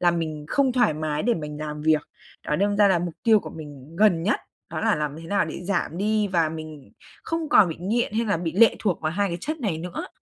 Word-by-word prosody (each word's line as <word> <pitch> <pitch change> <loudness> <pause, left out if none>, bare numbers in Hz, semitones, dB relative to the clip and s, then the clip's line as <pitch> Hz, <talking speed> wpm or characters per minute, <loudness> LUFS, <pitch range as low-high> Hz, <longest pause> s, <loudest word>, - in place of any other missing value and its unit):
là 175 -1 +4
mình 155 -3 -3
không 270 -3 +2
thoải 245 -11 +3
mái 155 -1 -2
để 240 +1 +2
mình 150 -2 -6
làm 150 0 -5
việc. 155 -1 +2 0.4
Đó, 150 - 0
đâm 205 +1 +1
ra 205 -1 +5
là 185 -3 +3
mục 175 -1 -4
tiêu 220 -3 +5
của - - -8
mình 150 0 -11
gần 185 -5 +4
nhất, 210 - +1 0.3
đó - - -3
là 225 -1 +2
làm 150 -1 -3
thế 165 - -9
nào 200 +3 +1
để - - -6
giảm 175 -3 -1
đi 210 0 +1
và 165 -4 +2
mình 155 -3 -9 0.3
không 330 -2 -3
còn 200 - +6
bị 160 - -5
nghiện 215 +4 0
hay 230 +2 0
là 200 - +1
bị 165 -1 -3
lệ 225 +5 +5
thuộc 195 -5 -1
vào 155 0 -1
2 200 +2 0
cái 170 - -4
chất 310 - -4
này 185 -9 -1
nữa. 175 +1 -6
175 Hz, 260 wpm, -24 LUFS, 155-210 Hz, 0.4 s, còn